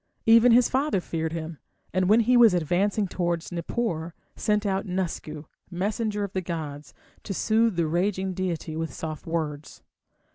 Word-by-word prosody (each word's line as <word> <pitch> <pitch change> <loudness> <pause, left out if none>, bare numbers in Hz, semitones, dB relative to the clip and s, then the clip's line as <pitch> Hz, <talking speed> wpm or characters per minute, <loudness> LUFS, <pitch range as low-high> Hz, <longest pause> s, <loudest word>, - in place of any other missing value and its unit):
Even 230 +2 +7
his 240 +1 +6
father 265 -5 +1
feared 160 -2 -3
him, 160 -1 -5 0.3
and 185 0 +1
when 220 +3 +6
he 245 +3 +3
was 230 -6 +7
advancing 190 +5 +1
towards 175 -2 -2
Nippur, 170 -2 -3 0.2
sent 210 0 0
out 195 -1 -1
Nusku, 170 -4 -4 0.2
messenger 205 +3 -2
of 200 - -5
the 190 - -1
gods, 155 -4 -6 0.3
to 195 - -5
soothe 225 0 +2
the 170 -1 +1
raging 190 +3 0
deity 175 -4 -3
with 160 0 -3
soft 155 -1 -6
words. 155 -3 -4
180 Hz, 155 wpm, -26 LUFS, 165-210 Hz, 0.3 s, Even